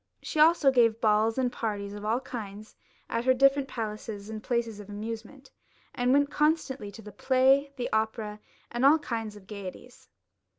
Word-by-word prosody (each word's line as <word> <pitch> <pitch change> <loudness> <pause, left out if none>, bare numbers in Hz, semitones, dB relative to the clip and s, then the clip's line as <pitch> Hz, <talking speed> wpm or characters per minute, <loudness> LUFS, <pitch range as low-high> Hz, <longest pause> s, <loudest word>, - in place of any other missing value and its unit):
She 310 - -3
also 310 -3 +6
gave 230 -3 +3
balls 220 +1 +2
and 255 -2 +1
parties 205 -4 -4
of 205 0 -8
all 225 +4 0
kinds 215 -4 -8 0.3
at 230 0 -2
her 260 0 +4
different 275 +1 +4
palaces 215 -3 -6
and 215 -1 -6
places 230 -2 -2
of 205 -1 -10
amusement, 225 +6 -7 0.4
and 245 0 +1
went 285 +1 +3
constantly 300 -7 0
to 225 - -11
the 210 - -10
play, 270 +3 +3
the 250 -2 -3
opera, 220 -1 -1 0.3
and 240 +1 -2
all 285 +3 +7
kinds 225 -8 -4
of 205 -2 -14
gaieties. 200 +4 -10
230 Hz, 170 wpm, -28 LUFS, 210-265 Hz, 0.4 s, all